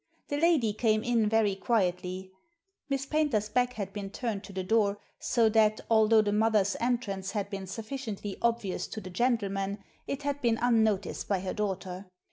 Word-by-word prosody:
The 285 - -1
lady 295 -9 +3
came 215 0 +1
in 230 -3 +2
very 220 -2 +3
quietly. 185 -3 -1 0.6
Miss 275 -1 -1
Paynter's 275 -9 +1
back 250 +2 +1
had 200 -4 -5
been 200 -2 -5
turned 215 -1 -3
to - - -10
the 190 -1 -3
door, 205 +1 +2 0.2
so 235 -3 +2
that, 215 -1 +3
although 220 0 +5
the 205 - 0
mother's 210 -2 +2
entrance 200 -6 -1
had 200 -1 -2
been 195 -1 -5
sufficiently 215 -1 -5
obvious 230 -5 0
to - - -6
the 185 -3 -9
gentleman, 200 -3 0 0.3
it 275 +1 -3
had 285 0 -2
been 235 -3 +2
unnoticed 220 -5 +1
by 195 -3 0
her 190 - -3
daughter. 190 -2 -3
215 Hz, 170 wpm, -29 LUFS, 195-235 Hz, 0.6 s, although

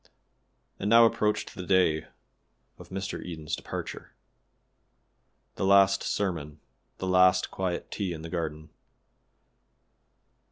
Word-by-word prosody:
And 100 - -1
now 115 +1 +8
approached 105 -2 0
the 95 - -7
day 90 -4 +2 0.7
of - - -12
Mr. 95 +1 -4
Eden's 80 -3 -5
departure. - - -7 1.4
The - - -2
last 100 0 +5
sermon 80 -7 -3 0.4
the - - -4
last 95 0 +4
quiet 90 -2 -3
tea 100 -4 -2
in 80 -2 -6
the 85 - -7
garden. 80 -2 -4
95 Hz, 110 wpm, -28 LUFS, 80-100 Hz, 1.4 s, now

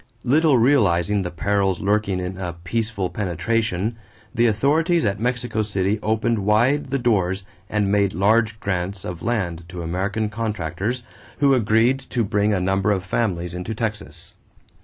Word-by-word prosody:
Little 145 +1 +4
realizing 105 -6 +3
the 90 - -3
perils 95 +2 0
lurking 100 -1 +1
in 90 +1 -4
a 90 -2 -4
"peaceful 105 -1 -2
penetration," 105 +3 -1 0.4
the 120 -1 +3
authorities 150 - +2
at 100 0 0
Mexico 120 -2 -1
City 100 0 0
opened 110 +1 +1
wide 120 +8 +2
the 135 - 0
doors 100 -6 +1 0.3
and 105 -2 0
made 100 -1 +3
large 110 +3 +2
grants 95 -1 -3
of 90 -1 -6
land 90 -8 -2
to 90 -2 -6
American 95 +6 -1
contractors, 110 +2 -3 0.3
who 140 -1 +4
agreed 115 +2 +3
to 120 -3 -2
bring 105 0 +1
a 100 - +1
number 95 +3 +1
of 95 -3 0
families 90 -4 -1
into 90 +5 -4
Texas. 105 -1 -4
105 Hz, 150 wpm, -22 LUFS, 95-115 Hz, 0.4 s, Little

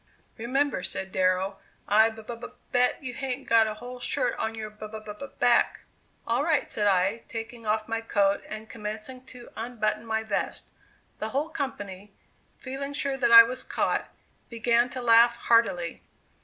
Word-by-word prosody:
"Remember," 265 +1 0
said 190 +1 -3
Darrow, 185 +1 +1 0.3
"I 220 +2 +5
b 220 -1 -11
b 235 - -6 0.4
bet 250 +3 +2
you 250 -2 -5
hain't 265 +1 -4
got 225 -1 +5
a 215 - -4
whole 245 +3 -9
shirt - - 0
on 225 0 -2
your 215 -1 -6
b 215 0 -9
b 215 -1 -8 0.2
back!" 245 -1 +3 0.4
"All 235 +4 +1
right," 310 -2 +1
said 210 -1 +1
I, 195 +3 +2
taking 225 0 -7
off 215 0 0
my 225 0 -2
coat 200 -3 +1
and 215 0 -7
commencing 215 +4 -7
to 250 -2 -11
unbutton 215 -2 -2
my 220 0 -1
vest. 215 -2 -3 0.5
The 215 - -3
whole 285 +6 -1
company, 205 - -6 0.4
feeling 275 +2 -5
sure 280 -1 -1
that 240 -3 +1
I 230 0 +12
was 255 +3 -5
caught, - - -1 0.4
began 235 +1 +2
to 255 0 -6
laugh 235 0 +6
heartily. 230 -8 +1
230 Hz, 165 wpm, -27 LUFS, 215-250 Hz, 0.5 s, I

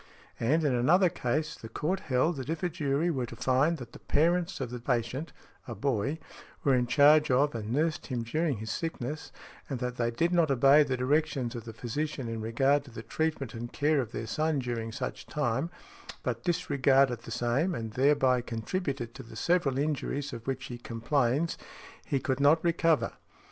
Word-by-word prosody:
And, 155 +8 +2
in 145 -4 +2
another 170 +10 +4
case, 155 0 -1
the 115 - -10
court 175 +10 -1
held 145 +3 +1
that 130 +1 -6
if 165 +1 -3
a 180 - +2
jury 155 0 0
were 130 -5 -2
to - - -9
find 135 +6 +2
that 120 -4 -9
the - - -12
parents 170 +4 +1
of 125 -3 -4
the 125 - -5
patient 125 +5 -2 0.4
(a 120 - -5
boy) 130 +6 -1 0.5
were 140 - +4
in 125 -1 +2
charge 150 +4 +6
of 140 +3 +3
and 110 -2 -4
nursed 155 +4 0
him 125 -4 -2
during 150 +3 0
his 110 +2 -5
sickness, 155 -3 -4 0.4
and 135 - -2
that 125 0 -4
they 120 -1 +1
did 165 +9 0
not 170 -3 +3
obey 135 +3 +6
the 135 -3 +1
directions 135 -1 0
of 120 -2 -7
the 115 - -6
physician 130 +4 -3
in 115 -1 -4
regard 135 +6 +2
to - - -12
the 115 -1 -8
treatment 155 -5 -2
and 120 +1 -6
care 150 -1 +2
of 120 -3 -6
their 115 - -4
son 155 +7 0
during 120 -3 -3
such 125 +2 -5
time, 140 +1 -1 0.5
but - - -2
disregarded 135 - +2
the 115 - -12
same, 125 +10 0
and 115 -4 -4
thereby 130 0 +3
contributed 120 - -3
to - - -9
the 115 - -12
several 145 +1 +1
injuries 145 -1 -2
of 115 +1 -8
which 135 0 -2
he 120 -2 -7
complains, 125 +6 0 0.5
he 140 - 0
could 130 0 -1
not 145 +3 +6
recover. 165 -2 +2
135 Hz, 190 wpm, -29 LUFS, 120-155 Hz, 0.5 s, charge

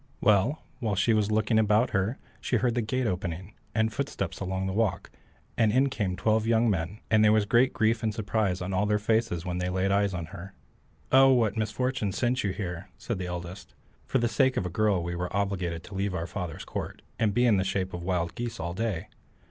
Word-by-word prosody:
Well, 105 +8 +2 0.2
while 110 -5 -1
she 110 +4 +3
was 105 -1 +2
looking 110 +1 +2
about 110 +3 +3
her 100 +5 0 0.2
she - - -1
heard 120 +1 +2
the 120 - 0
gate 125 +4 -1
opening, 90 -1 -3 0.2
and 110 -1 +1
footsteps 125 - -3
along 95 0 -2
the 95 - -2
walk, 105 -4 -1 0.4
and 110 -2 +3
in 130 +4 +3
came 100 -7 -1
twelve 110 +2 +1
young 115 0 +3
men, 90 +2 -2
and 110 -1 +5
there 105 - +6
was 110 -1 +3
great 120 +5 +4
grief 110 +1 +1
and 110 - 0
surprise 105 -4 -1
on 95 +2 -4
all 105 +3 +1
their 105 0 +2
faces 105 -5 0
when 90 0 -2
they 90 0 -1
laid 95 +1 0
eyes 100 -1 +2
on 85 -2 -3
her. 95 +1 -9 0.6
"Oh, 135 0 +7
what 115 -5 +2
misfortune 110 0 -1
sent 125 +4 0
you 100 - 0
here?" 95 -1 -5
said 115 -6 -4
the 90 - -3
eldest. 90 +2 -7 0.3
"For - - +1
the 120 -2 +2
sake 130 +3 +2
of 100 - 0
a - - -2
girl 105 -3 +1
we 85 +1 -3
were 90 +1 -3
obliged 95 -4 -2
to 100 - -11
leave 95 0 -1
our 80 - -2
father's 90 -3 -5
court, - - -6 0.2
and 110 -2 +2
be 120 +5 +2
in 110 -4 +4
the 95 - +2
shape 95 -1 -2
of 90 - -5
wild 85 -1 -1
geese 120 -1 -5
all 85 +1 -3
day. 100 -3 -2
105 Hz, 225 wpm, -28 LUFS, 95-115 Hz, 0.6 s, Oh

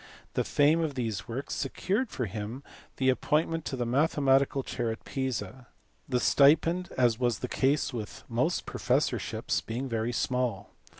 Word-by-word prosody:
The - - +1
fame 150 +3 +3
of 155 -4 -2
these 115 -5 -3
works 130 +4 -4
secured 200 - -1
for 125 - -3
him 110 +6 -5 0.3
the 130 -1 +2
appointment 155 +4 +1
to 135 - -3
the 120 -2 -2
mathematical 135 +1 +2
chair 120 -2 -2
at 110 - -6
Pisa 130 -2 -4 0.4
the 125 -2 +2
stipend, 165 +7 +4
as 120 -3 +3
was 120 -3 +1
the 125 - -4
case 135 +1 +1
with 110 -4 -6
most - - 0
professorships, - - 0
being 125 +4 -4
very 115 -1 -1
small. 120 -4 -1
130 Hz, 155 wpm, -29 LUFS, 120-140 Hz, 0.4 s, stipend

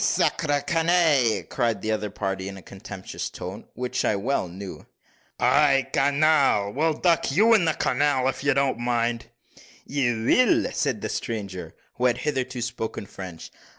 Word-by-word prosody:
"Sacre, 145 -3 +1
canaille!" 160 -7 +3
cried 115 -5 -1
the 110 - -1
other 105 -1 -1
party, 95 -1 -3
in 100 0 -7
a 95 - -12
contemptuous 95 0 -7
voice, 95 +5 -7
which 125 0 -2
I 105 - +2
well 105 +1 -1
knew. 95 +2 -9 0.5
"Ay, 140 -2 +3
canal! 140 -7 +3
we'll 160 +3 +1
duck 170 -4 +2
you 220 +10 +5
in 205 -6 +4
the 160 - +1
canal, 135 0 +1
if 130 0 -2
you 145 -1 +2
don't 135 -3 +1
mind." 120 -1 -1 0.6
"You 120 -5 -1
will!" 250 - +3
said 130 -8 -1
the - - -3
stranger, 95 -7 -5 0.2
who 125 - 0
had 120 -1 +3
hitherto 130 -4 -2
spoken 115 -3 -4
French. 90 -4 -9
125 Hz, 155 wpm, -25 LUFS, 105-145 Hz, 0.6 s, you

